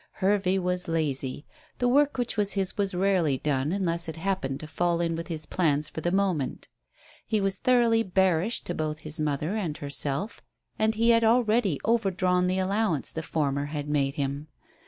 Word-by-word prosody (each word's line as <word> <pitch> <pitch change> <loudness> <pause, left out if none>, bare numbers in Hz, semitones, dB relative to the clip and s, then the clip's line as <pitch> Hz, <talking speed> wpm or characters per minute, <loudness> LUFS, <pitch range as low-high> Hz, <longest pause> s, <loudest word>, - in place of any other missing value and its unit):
Hervey 195 -1 +1
was 180 -1 -1
lazy. 145 -4 -2 0.3
The 245 - +1
work 285 +3 +3
which 245 -1 -1
was 205 -2 +1
his 190 -2 -1
was 200 -3 0
rarely 180 -7 +2
done 145 +1 -1
unless 170 -3 -1
it 160 - -5
happened 165 -6 -2
to - - -6
fall 175 +1 0
in 165 -1 0
with 165 0 -5
his 160 -3 -4
plans 150 -4 0
for 160 - -6
the 175 - 0
moment. 185 -9 -1 0.6
He 220 -1 +1
was 195 -1 -1
thoroughly 240 -3 +3
bearish 190 +1 +1
to - - -4
both 155 -1 -2
his 155 +1 -5
mother 155 +5 -1
and 175 -9 -2
herself, 145 +6 -2 0.4
and 220 0 +2
he 230 +2 +4
had 230 0 +4
already 220 - +3
overdrawn 185 -5 +2
the 185 +1 0
allowance 190 -5 0
the 160 - -4
former 145 -3 -1
had 145 0 -5
made 140 -2 0
him. 140 +1 -3
180 Hz, 180 wpm, -27 LUFS, 150-200 Hz, 0.6 s, he